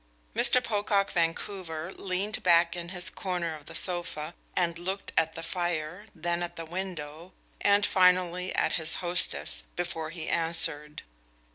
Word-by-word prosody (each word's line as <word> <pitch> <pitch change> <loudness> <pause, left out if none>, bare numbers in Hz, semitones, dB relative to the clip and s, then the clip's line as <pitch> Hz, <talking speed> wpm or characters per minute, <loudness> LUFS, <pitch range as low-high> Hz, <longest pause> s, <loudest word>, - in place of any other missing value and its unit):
Mr. 250 - +4
Pocock 205 -3 +1
Vancouver 170 0 -2
leaned 195 +2 -2
back 170 -1 +4
in 170 -1 -5
his 180 -1 +1
corner 175 -4 -2
of 150 -2 -14
the - - -9
sofa 175 -3 -1 0.2
and 170 -2 +1
looked 190 +3 -4
at 160 0 +2
the 165 - -6
fire, 175 +2 -3
then 170 +1 -1
at 175 - -4
the 165 - -6
window, 170 -1 -6 0.3
and 205 0 +4
finally 180 -1 +3
at - - +1
his 160 - +5
hostess, 175 0 +1
before 170 -3 -3
he 165 -1 -7
answered. 165 -3 0
175 Hz, 145 wpm, -29 LUFS, 165-185 Hz, 0.3 s, his